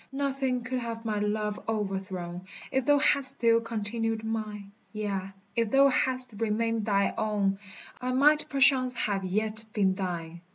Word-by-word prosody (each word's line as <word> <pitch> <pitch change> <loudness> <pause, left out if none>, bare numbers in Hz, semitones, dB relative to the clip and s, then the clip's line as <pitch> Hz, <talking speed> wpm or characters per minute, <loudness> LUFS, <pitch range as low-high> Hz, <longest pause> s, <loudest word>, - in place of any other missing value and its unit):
Nothing 270 -2 -1
could 255 0 -3
have 230 -1 -6
my 215 -2 -1
love 210 0 -2
o'erthrown, 190 -4 -3 0.3
If 265 -1 0
thou 290 0 +5
hadst 275 -2 +6
still 230 -1 +3
continued 225 0 -2
mine; 215 -2 -5 0.2
Yea, 195 -3 -4 0.2
if 230 -2 +1
thou 275 +3 +5
hadst 255 -2 0
remained 225 0 -1
thy 200 -1 +2
own, 200 -2 0 0.4
I 250 0 -2
might 295 +4 +4
perchance 260 -2 +4
have 200 -4 -1
yet 215 +3 -1
been 195 -3 +2
thine. 170 -3 -5
220 Hz, 150 wpm, -28 LUFS, 200-255 Hz, 0.4 s, hadst